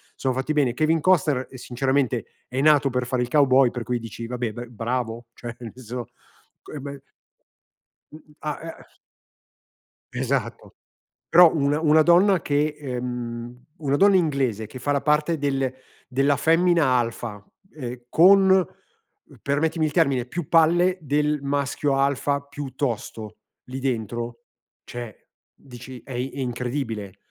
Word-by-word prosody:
sono 130 -1 -1
fatti 135 +4 -1
bene. 135 -5 +2
Kevin 155 +2 +2
Costner, 155 -8 +2
uhm, 130 - -11
sinceramente 130 0 -1 0.2
è 130 +2 -2
nato 145 -2 +4
per 125 0 -1
fare 125 -1 0
il - - -3
cowboy, 135 -3 +4
per 120 - -5
cui 125 +1 -1
dici 115 0 -7
vabbè 120 -2 -3
ber 120 +1 -8
bravo 120 0 -3
cioè 120 -1 -8
nel 115 -3 -8
senso, 125 -1 -7 0.5
co - - -13
e 150 - -5
be 140 0 -8 1.1
M 155 - -11
m 150 - -21
a 150 - -2 0.3
e - - -17 1.3
Esatto. - - -3 0.5
Però 175 -1 +7
una 145 0 +1
una 155 0 +5
donna 180 +2 +5
che 150 +1 0
ehm 125 -3 -5 0.2
una 140 -1 +1
donna 200 +3 +5
inglese 135 - 0
che 130 - -10
fa 135 +3 -2
la 140 -1 +1
parte 150 +2 +1
del 135 -2 -1 0.3
della 135 +2 +2
femmina 165 +2 +3
alfa, 115 -3 -3 0.3
ehm, 125 -4 -7
con, 190 +2 +6 0.8
permettimi 155 +3 0
il 155 - -1
termine, 140 -7 +2
più 160 +4 -5
palle 175 +3 +4
del 150 0 0
maschio 140 0 -1
alfa 140 +1 +1
più 140 -2 -8
tosto 115 -5 -4 0.3
lì 130 +1 -6
dentro, 120 -2 -3 0.4
cioè 120 -3 -8 0.4
dici: 130 -1 -11
"È 135 - -12
i 125 +2 -2
è 140 - -8
incredibile". 120 -5 -4
135 Hz, 145 wpm, -24 LUFS, 120-150 Hz, 1.3 s, Però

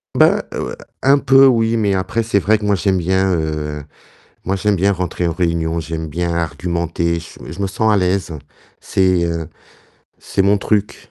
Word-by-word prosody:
Ben, - - +4
heu, - - -4 0.3
un 140 +1 +5
peu 135 0 +6
oui, 115 -2 +2
mais 105 -3 +1
après, 95 +4 -1
c'est 110 -3 +1
vrai 110 +3 +2
que 105 - -6
moi 105 -1 +2
j'aime 95 +1 +1
bien, 95 +2 +1
heu, 75 -2 -3 0.6
moi 95 +2 -1
j'aime 100 +1 +1
bien 100 +3 +2
rentrer 90 -1 -2
en 85 - 0
réunion, 85 -1 -1
j'aime 80 0 -5
bien 85 +2 -2
argumenter, 85 +1 -2
j 85 - -10 0.2
je 85 - -8
me - - +1
sens 110 +3 0
à 105 - +4
l'aise, 95 -1 0 0.5
c'est, 95 -2 +1
heu, 85 -2 -3 0.7
c'est 95 - -1
mon 100 +1 +3
truc. 105 0 -2
95 Hz, 185 wpm, -18 LUFS, 85-100 Hz, 0.7 s, peu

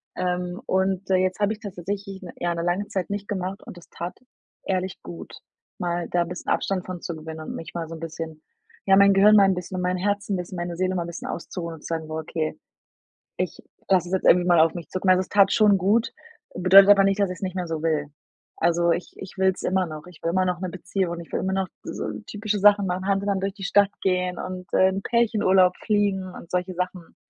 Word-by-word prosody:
Ähm, 180 0 -2
und, 190 0 0
äh, - - +5
jetzt 185 +1 +1
habe 205 +1 +2
ich 210 - -11
das 200 -3 -7
tatsächlich 195 +2 -5 0.2
ja 175 0 0
'ne 170 - -3
lange 180 +4 0
Zeit 190 -2 -3
nicht 205 0 -4
gemacht 190 -1 -3
und - - -10
das 175 - -15
tat 175 +2 -6 0.5
ehrlich 185 0 -2
gut, 85 -1 -9 0.5
mal 175 -1 -2
da 175 -1 +2
'n - - -8
bisschen 180 +2 -6
Abstand 190 -2 0
von 185 -1 -6
zu 170 - -5
gewinnen 160 0 -8
und 155 - -6
mich 165 - -8
mal 170 -1 -4
so 165 - -8
'n - - -10
bisschen 160 -1 -6 0.4
ja, 195 - +6
mein 200 0 +7
Gehirn 205 +2 +6
mal 200 - +7
'n 195 - +3
bisschen 180 +1 -6
und 180 - -2
mein 180 0 +1
'n - - -5
Herzen 205 0 0
bisschen, 180 0 -5
meine 175 0 -3
Seele 185 +1 0
mal 175 - 0
'n - - -7
bisschen 170 0 -7
auszuruhen 170 -1 -5
und 155 - -15
zu - - -7
sagen: 160 -1 -4
„Okay, 160 0 -3 0.8
ich - - -3 0.3
lasse 180 -3 +3
es - - -5
jetzt 190 - 0
irgendwie 175 0 +6
mal 175 -2 +5
auf 160 +1 +4
mich 170 -2 -7
zukommen." 185 0 +1
Also, 185 0 +4
es 185 - -7
tat 200 -1 +5
schon 210 -2 +5
gut, 210 +6 +2 0.4
bedeutet 190 +2 +7
aber 200 -1 +7
nicht, 195 +1 +1
dass 200 -2 +2
ich's 180 - -8
nicht 185 -1 -3
mehr 180 -1 -2
so 160 -2 -3
will. 155 -3 0 0.5
Also 170 0 +2
ich 175 +2 -2
ich 190 +1 -10
will's 190 -1 +1
immer 185 -1 +1
noch. 155 -1 -8
Ich 180 -3 -15
will 165 - +1
immer 185 +1 +2
noch 180 -1 -1
'ne 185 0 -3
Beziehung 185 0 -2
und 170 - -6
ich 165 - -14
will - - 0
immer 190 0 -1
noch 190 -1 0 0.2
so - - -5 0.2
typische 210 0 -2
Sachen 205 0 +5
machen, 185 +1 -2
Hand 195 0 +1
in 205 - -1
Hand 195 -1 -1
durch 195 0 -1
die 200 - -9
Stadt 200 0 +4
gehen 180 -1 0
und, 185 -1 -6
äh, 185 - +5
in 190 +1 -3
Pärchenurlaub 195 -6 +3
fliegen 205 -3 +1
und 170 - -12
solche 180 +1 -1
Sachen, 180 -1 -5
185 Hz, 250 wpm, -24 LUFS, 175-195 Hz, 0.8 s, mein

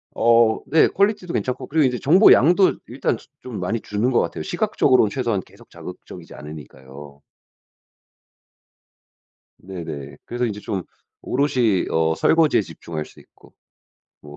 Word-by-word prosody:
어 115 -1 +3
네. 160 +2 +4
퀄리티도 200 -3 0
괜찮고 125 - -3
그리고 155 0 +2
이제 125 -2 -1
정보량도 180 - +5
일단 - - -2
조 - - -19
좀 125 -4 -7
많이 90 +6 -2
주는 105 +5 -1
것 120 - +3
같아요. - - -3
시각적으로는 145 - +2
최소한 115 -4 -2
계속 - - -20
자극적이지 - - -11
않으니까요. 70 -1 -12 2.4
네네. 80 -7 -8
그래서 120 +1 -2
인제 105 -3 -4
좀 95 -3 -4 0.4
오롯이 125 -8 0
어 80 0 +1
설거지에 160 - +3
집중할 80 -5 -7
수 - - -18
있고. - - -22 0.7
뭐. 75 0 -13
115 Hz, 310 characters per minute, -21 LUFS, -, 2.4 s, 정보량도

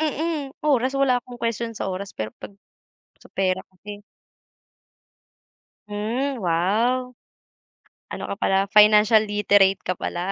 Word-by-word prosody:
Mm, 310 -1 -2
oras 265 -3 +1
wala 255 -3 +3
akong 245 -1 -12
question 230 0 -2
sa - - -3
oras 195 +2 -6
pero 110 0 -4
pag - - -8 0.7
sa - - -18
pera 185 -1 0
kasi 205 +2 -11 1.9
Hmm, 235 +7 -2
wow. 230 +9 0 0.9
Ano - - -7
ka 200 - -5
pala 195 -2 +1
financial 210 +1 +6
literate 205 -2 +3
ka 185 - -3
pala. 180 +3 -3
210 Hz, 120 wpm, -23 LUFS, 195-250 Hz, 1.9 s, financial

